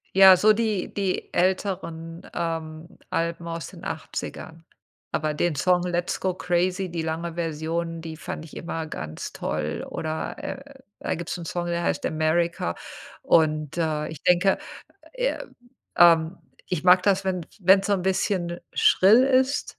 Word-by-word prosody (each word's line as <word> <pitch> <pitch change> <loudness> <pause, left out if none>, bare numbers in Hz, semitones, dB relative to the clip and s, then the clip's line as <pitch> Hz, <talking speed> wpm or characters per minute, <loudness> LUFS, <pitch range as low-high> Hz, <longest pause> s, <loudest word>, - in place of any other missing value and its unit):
Ja, 190 -1 +9
so 215 +3 +5
die 215 -4 -1
die 195 -2 -2
älteren, 175 -3 -1
ähm, 165 -1 -4 0.2
Alben 170 0 -2
aus 165 -3 -5
den - - -13
80ern, 165 +1 -6 0.5
aber 155 0 -1
den 160 +1 0
Song 180 +5 +3
„Let's 175 0 -1
go 185 -1 -1
crazy“, 180 +1 0
die 170 - -2
lange 165 +1 -3
Version, 165 0 -3
die 160 -1 -7
fand 160 0 -6
ich 155 - -13
immer 165 -1 -4
ganz 80 - -6
toll, 75 0 -3
oder, 160 0 -4
äh, 270 - -6 0.4
da - - -2
gibt's 170 0 -4
'n 170 - -7
Song, 175 +1 -3
der 170 0 -1
heißt - - -1
„America“ 155 - 0 0.5
und, 155 -2 +2
äh, 155 -2 0
ich 155 -3 -9
denke, 180 +2 +4 0.6
äh, - - -1 0.6
ähm 165 0 +6 0.3
ich 180 -1 -2
mag 180 0 +7
das, 195 -1 +2
wenn 185 -3 -2
wenn's 195 +1 +5
so 205 - +3
'n 185 - -2
bisschen 185 -2 -1
schrill 215 +7 +6
ist 265 +1 +1
170 Hz, 150 wpm, -25 LUFS, 160-185 Hz, 0.6 s, Ja